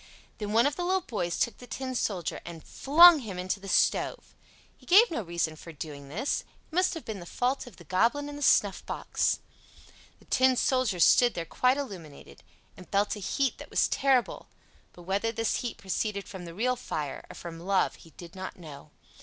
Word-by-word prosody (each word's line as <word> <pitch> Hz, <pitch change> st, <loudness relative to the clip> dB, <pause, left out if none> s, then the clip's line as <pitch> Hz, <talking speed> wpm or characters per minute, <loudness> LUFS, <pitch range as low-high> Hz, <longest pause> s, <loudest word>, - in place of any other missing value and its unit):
Then 210 Hz, -1 st, -4 dB
one 230 Hz, +3 st, +4 dB
of 290 Hz, 0 st, +1 dB
the 355 Hz, -, -2 dB
little 375 Hz, +2 st, +1 dB
boys 175 Hz, -, -3 dB
took 235 Hz, -, -1 dB
the 245 Hz, -, -12 dB
Tin 260 Hz, 0 st, -5 dB
Soldier 190 Hz, -8 st, -2 dB
and 170 Hz, -2 st, -9 dB
flung 330 Hz, +3 st, +7 dB
him 210 Hz, -8 st, -7 dB
into 185 Hz, +2 st, -2 dB
the 195 Hz, -, -10 dB
stove. -, -, +1 dB, 0.4 s
He -, -, -22 dB
gave 415 Hz, +5 st, +7 dB
no 275 Hz, -, -2 dB
reason 170 Hz, -3 st, -2 dB
for 165 Hz, +2 st, -11 dB
doing 145 Hz, -2 st, -8 dB
this. 215 Hz, -, -1 dB
It -, -, -29 dB
must 365 Hz, +1 st, +2 dB
have 325 Hz, -, -8 dB
been 215 Hz, -3 st, -5 dB
the 175 Hz, -, -9 dB
fault 255 Hz, +6 st, -1 dB
of 235 Hz, -, -12 dB
the 170 Hz, -, -15 dB
Goblin 230 Hz, -, +1 dB
in 290 Hz, -, -7 dB
the 290 Hz, -, -8 dB
snuffbox. 205 Hz, -7 st, +1 dB, 0.8 s
The -, -, -23 dB
Tin 260 Hz, 0 st, +3 dB
Soldier 250 Hz, -7 st, +1 dB
stood 240 Hz, +7 st, +5 dB
there 170 Hz, -, -3 dB
quite 255 Hz, -, +2 dB
illuminated, 180 Hz, -, -8 dB, 0.3 s
and 180 Hz, -, -14 dB
felt 205 Hz, +2 st, +1 dB
a -, -, -8 dB
heat 265 Hz, +6 st, -1 dB
that -, -, -10 dB
was -, -, +2 dB
terrible; 265 Hz, -3 st, +1 dB, 0.4 s
but 175 Hz, -, -14 dB
whether 200 Hz, +5 st, -1 dB
this 225 Hz, -1 st, -1 dB
heat 240 Hz, -2 st, -4 dB
proceeded 200 Hz, +1 st, -3 dB
from 190 Hz, -5 st, -8 dB
the 170 Hz, 0 st, -9 dB
real 250 Hz, +5 st, +1 dB
fire 150 Hz, -, -5 dB
or -, -, -10 dB
from 165 Hz, -1 st, -8 dB
love 190 Hz, +2 st, +1 dB
he 165 Hz, -, -16 dB
did 170 Hz, 0 st, -11 dB
not 190 Hz, 0 st, -7 dB
know. 150 Hz, -5 st, -11 dB
210 Hz, 205 wpm, -28 LUFS, 175-260 Hz, 0.8 s, flung